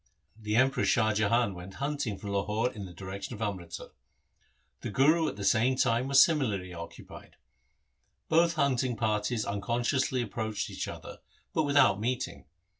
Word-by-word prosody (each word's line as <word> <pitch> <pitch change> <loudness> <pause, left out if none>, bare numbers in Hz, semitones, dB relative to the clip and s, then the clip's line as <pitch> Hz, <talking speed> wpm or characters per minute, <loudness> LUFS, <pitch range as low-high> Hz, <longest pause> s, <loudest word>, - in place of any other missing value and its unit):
The 105 -1 -3
Emperor 130 +3 +3
Shah 110 -3 +3
Jahan 110 +1 +2
went 90 +2 -10
hunting 140 -7 -2
from 100 0 -6
Lahore 105 +4 0
in 105 -4 -7
the 90 - -10
direction 95 +6 -7
of 105 - -11
Amritsar. 90 -5 -5 0.9
The - - -5
Guru 155 +9 +3
at - - -3
the 100 - -6
same 120 +6 +3
time 120 0 +1
was 135 -1 +7
similarly 105 - -1
occupied. 85 -1 -10 0.9
Both 170 +1 +3
hunting 130 -4 +1
parties 110 0 0
unconsc 115 +5 -1
ously 130 -2 +1
approached 110 -1 -4
each - - -4
other, - - -9 0.3
but 160 - +1
without 140 -8 +4
meeting. 125 +3 -3
115 Hz, 155 wpm, -29 LUFS, 100-130 Hz, 0.9 s, was